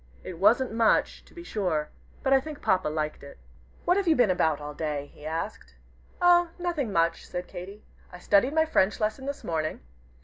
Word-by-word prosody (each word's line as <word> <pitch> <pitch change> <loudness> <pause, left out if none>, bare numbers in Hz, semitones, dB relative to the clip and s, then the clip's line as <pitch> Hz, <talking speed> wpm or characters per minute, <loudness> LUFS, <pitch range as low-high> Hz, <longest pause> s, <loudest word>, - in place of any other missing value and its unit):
It 175 -3 -8
wasn't 230 +6 +4
much, 225 -1 +2
to - - -21
be 340 - -9
sure, 175 - -1 0.3
but 270 - +3
I 270 - +6
think 305 0 -8
Papa 185 -1 +2
liked 155 0 -3
it. 140 - -12 0.5
"What 360 - +3
have 395 -2 0
you 325 - +5
been 240 -8 +4
about 160 -4 +1
all 150 0 -7
day?" 145 -2 -4
he 150 - -10
asked. 155 - -5 0.4
"Oh, 350 -1 +5
nothing, 340 - -2
much," 165 -2 0
said 180 0 -5
Katy. 195 +3 -9 0.3
"I 180 - -9
studied 205 - +2
my 320 0 +4
French 210 -10 +2
lesson 220 +6 -2
this 280 0 -5
morning. 155 -2 -2
200 Hz, 195 wpm, -27 LUFS, -, 0.5 s, I